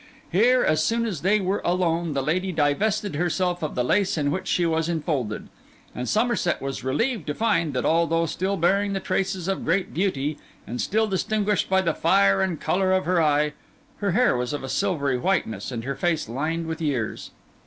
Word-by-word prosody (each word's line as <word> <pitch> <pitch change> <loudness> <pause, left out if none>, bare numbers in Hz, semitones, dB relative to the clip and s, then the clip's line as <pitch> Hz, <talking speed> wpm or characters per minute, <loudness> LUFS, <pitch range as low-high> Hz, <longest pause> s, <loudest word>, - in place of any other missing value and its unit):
Here, 245 +8 +4
as 155 - +2
soon 230 0 +1
as 195 -10 -3
they 205 +4 +3
were 195 +1 -1
alone, 170 -2 0
the 135 - 0
lady 185 +6 0
divested 195 +6 0
herself 175 +2 0
of 155 - -3
the 125 - +1
lace 190 +7 +1
in 145 -2 +1
which 185 +4 -3
she 175 - +1
was 160 0 0
enfolded; 145 -9 -2 0.5
and 125 0 -4
Somerset 225 -5 +1
was 135 0 -5
relieved 215 - -1
to 150 - -2
find, 165 - +1
that 125 - -1
although 165 0 +2
still 190 +4 -2
bearing 200 +4 +2
the 195 - -1
traces 190 -1 -2
of 195 -1 -1
great 185 +3 0
beauty, 155 -5 -1 0.3
and 120 +2 -4
still 220 +2 +1
distinguished 210 0 0
by 190 0 +3
the 165 -3 0
fire 195 +4 +3
and 185 -5 -1
colour 185 +4 +1
of 190 0 +2
her 180 0 +2
eye, 150 -1 +2 0.4
her 200 -4 -1
hair 245 - +3
was 125 +2 -2
of 145 - -4
a 135 - -5
silvery 145 -10 0
whiteness 125 - -1
and 115 -2 -4
her 135 +3 -2
face 160 0 0
lined 155 +8 -2
with 160 0 -5
years. 130 -8 -2
170 Hz, 195 wpm, -24 LUFS, 150-195 Hz, 0.5 s, Here